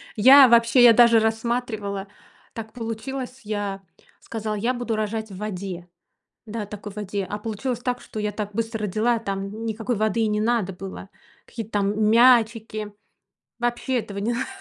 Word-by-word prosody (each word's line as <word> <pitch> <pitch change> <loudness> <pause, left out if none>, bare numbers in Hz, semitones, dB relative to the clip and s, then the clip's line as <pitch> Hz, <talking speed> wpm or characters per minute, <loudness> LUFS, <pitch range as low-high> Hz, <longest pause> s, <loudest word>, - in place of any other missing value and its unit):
Я 265 +5 +8
вообще, 235 +1 +5
я 235 -1 +9
даже 235 -1 +6
рассматривала, 220 -3 -2 0.5
так 220 -1 -8
получилось, 250 +3 -6
я 205 -2 -3 0.4
сказала: 215 -1 -4
"Я 230 +5 0
буду 240 -2 -3
рожать 220 0 -3
в 190 - -9
воде". 190 -4 -5 0.6
Да, 215 0 -4
такой 205 0 -8
в 210 - -19
воде. 200 -1 -3
А 210 - -4
получилось 230 +3 -4
так, 245 0 -2
что 215 - -9
я 210 0 -2
так 210 0 -5
быстро 225 -1 -2
родила, 220 +4 +1
там 200 +1 -5
никакой 225 +1 -2
воды 215 +2 0
и 220 - +2
не 210 0 0
надо 220 -4 0
было. 195 +1 -9 0.4
Какие-то 225 -2 -8
там 210 +1 +1
мячики. 225 -3 +3 0.7
Вообще 240 +1 -1
этого 205 -3 -7
не 215 +4 -1
надо 245 +3 -2
220 Hz, 165 wpm, -23 LUFS, 205-235 Hz, 0.7 s, я